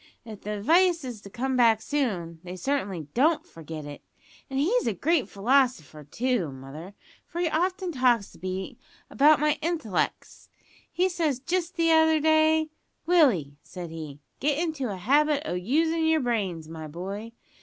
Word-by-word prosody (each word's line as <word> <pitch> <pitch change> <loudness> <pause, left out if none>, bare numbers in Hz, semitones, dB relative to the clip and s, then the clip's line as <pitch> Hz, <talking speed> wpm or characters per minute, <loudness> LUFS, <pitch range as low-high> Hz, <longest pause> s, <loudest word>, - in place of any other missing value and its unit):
If 215 -3 -9
the 210 0 -4
advice 340 - +3
is 245 -5 -7
to 200 - -11
come 260 +5 -2
back 230 -3 +5
soon 195 - -2
they 180 0 -7
certainly 200 - -2
don't 305 +6 +2
forget 160 -2 -9
it! 145 0 -9 0.5
And 265 - -3
he's 445 - +1
a - - 0
great 325 -5 +1
philosopher, 210 - +1
too, 225 - -1
mother, 140 +9 -10 0.3
for 340 - -6
he 350 - +1
often 365 +3 -1
talks 250 - +2
to - - -17
me 190 +7 -5 0.3
about 295 +2 +5
my 300 0 +1
int'lec's. 310 - -2 0.4
He 365 +1 +2
said 315 -8 -2
jist 360 0 -1
t'other 320 -1 +4
day, 315 0 +3 0.4
`Willie,' 230 - +3
said 175 -3 -8
he, 155 -3 -8 0.2
`get 285 0 +1
into 310 -6 -2
a 195 - -5
habit 285 +8 +2
o' - - -2
usin' 320 - +1
yer 320 0 +3
brains, 200 - -2
my 160 -1 -8
boy. 195 +8 -6
255 Hz, 160 wpm, -26 LUFS, -, 0.5 s, back